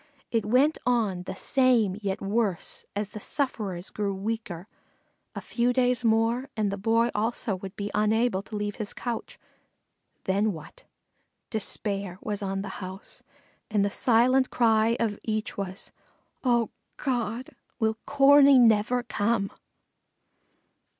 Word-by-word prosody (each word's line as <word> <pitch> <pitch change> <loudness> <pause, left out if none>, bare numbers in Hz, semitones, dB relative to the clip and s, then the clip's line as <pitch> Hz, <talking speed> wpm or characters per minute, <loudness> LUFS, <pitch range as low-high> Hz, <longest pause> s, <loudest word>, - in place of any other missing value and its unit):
It 225 -3 0
went 270 +7 +3
on 220 -7 +1
the - - -4
same 245 -6 +2
yet 195 -1 -2
worse, 200 -2 -1
as 205 0 -2
the 215 - -8
sufferers 205 -8 -2
grew 200 -2 -2
weaker 200 -3 -4 0.7
a - - -4
few 240 +1 0
days 250 -1 +2
more 230 +4 +2
and 210 -2 +1
the 200 - -3
Boy 230 +3 +2
also 220 -1 0
would 190 +1 -8
be 205 0 -4
unable 215 0 +2
to 210 - -9
leave 205 0 -3
his 215 -3 -4
couch. 240 -2 -5 0.9
Then 200 +2 +1
what? 155 -2 -12 0.7
Despair 200 -3 -2
was 210 -1 -3
on 195 0 -2
the 200 - -6
house 190 +2 -8 0.5
and 210 -2 +2
the 200 - -1
silent 255 +4 +4
cry 225 -1 +3
of 215 -3 -1
each 215 -1 -2
was, 190 -1 -6 0.5
"Oh, 240 -3 +2 0.3
God! 245 -2 -2 0.3
will 220 -1 0
Corney 280 0 +7
never 235 +1 +4
come?" 205 -3 0
220 Hz, 135 wpm, -27 LUFS, 200-240 Hz, 0.9 s, Corney